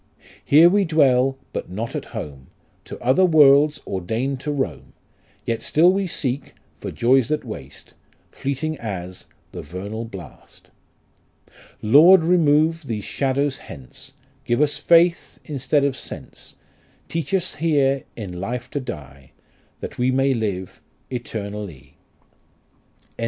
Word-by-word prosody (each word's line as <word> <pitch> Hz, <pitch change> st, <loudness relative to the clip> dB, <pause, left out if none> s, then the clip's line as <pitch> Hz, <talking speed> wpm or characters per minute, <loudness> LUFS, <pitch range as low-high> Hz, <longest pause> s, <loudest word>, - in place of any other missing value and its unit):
Here 155 Hz, +4 st, +7 dB
we 200 Hz, +3 st, +3 dB
dwell 135 Hz, -6 st, +3 dB, 0.2 s
but -, -, -4 dB
not 110 Hz, +6 st, -5 dB
at -, -, -4 dB
home, 70 Hz, -3 st, -8 dB, 0.4 s
To -, -, -9 dB
other 130 Hz, +10 st, +4 dB
worlds 150 Hz, -3 st, +5 dB
ordain'd 115 Hz, +9 st, -2 dB
to 150 Hz, +3 st, -3 dB
roam; 140 Hz, -2 st, -4 dB, 0.5 s
Yet 115 Hz, -1 st, -2 dB
still 175 Hz, +4 st, +4 dB
we 195 Hz, -1 st, -1 dB
seek 135 Hz, -4 st, -3 dB, 0.2 s
for -, -, -5 dB
joys 125 Hz, 0 st, +3 dB
that 155 Hz, -1 st, -1 dB
waste, 70 Hz, -, -10 dB, 0.4 s
Fleeting 145 Hz, +3 st, -3 dB
as 95 Hz, -5 st, -6 dB, 0.2 s
the -, -, -7 dB
vernal 100 Hz, +8 st, -6 dB
blast. 95 Hz, -, -13 dB, 1.1 s
Lord, 160 Hz, -, +7 dB
remove 160 Hz, -2 st, +2 dB
these 110 Hz, -4 st, -3 dB
shadows 140 Hz, 0 st, -1 dB
hence, 65 Hz, -, -11 dB, 0.3 s
Give 120 Hz, -1 st, 0 dB
us 150 Hz, 0 st, +1 dB
faith 170 Hz, 0 st, +3 dB
instead 140 Hz, -1 st, 0 dB
of 140 Hz, -2 st, +1 dB
sense; -, -, -9 dB, 0.5 s
Teach 165 Hz, -4 st, -4 dB
us 185 Hz, -2 st, 0 dB
here 140 Hz, -4 st, +1 dB
in 90 Hz, -6 st, -7 dB
life 120 Hz, +5 st, -5 dB
to 145 Hz, -, -2 dB
die,. 70 Hz, -, -9 dB, 0.5 s
That -, -, -7 dB
we 125 Hz, +1 st, +2 dB
may 135 Hz, +1 st, +2 dB
live 100 Hz, -6 st, -4 dB, 0.3 s
eternally. 100 Hz, -, -6 dB, 1.1 s
GOLDSMITH. -, -, -39 dB
130 Hz, 130 wpm, -22 LUFS, 105-150 Hz, 1.1 s, Here